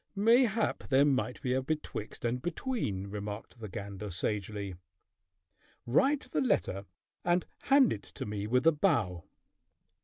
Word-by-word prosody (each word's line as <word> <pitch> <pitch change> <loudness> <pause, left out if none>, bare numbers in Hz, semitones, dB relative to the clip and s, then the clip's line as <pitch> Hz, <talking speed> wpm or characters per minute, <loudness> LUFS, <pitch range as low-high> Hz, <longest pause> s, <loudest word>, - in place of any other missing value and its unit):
"Mayhap 225 +1 +3
there 135 +1 +5
might 130 -3 +1
be 125 - +1
a 130 - +1
betwixt 135 -6 -4
and 120 +2 0
between," 175 - -2
remarked 105 +3 -6
the 110 -2 -6
gander 100 +2 -6
sagely. 100 +1 -2 1.1
"Write 270 - +2
the - - +1
letter 100 - +1 0.4
and 175 +1 +2 0.2
hand 275 -2 +6
it 100 - -6
to - - -8
me 105 -1 -3
with 125 +5 +2
a 165 - +8
bow." 120 - +1
125 Hz, 140 wpm, -31 LUFS, -, 1.1 s, a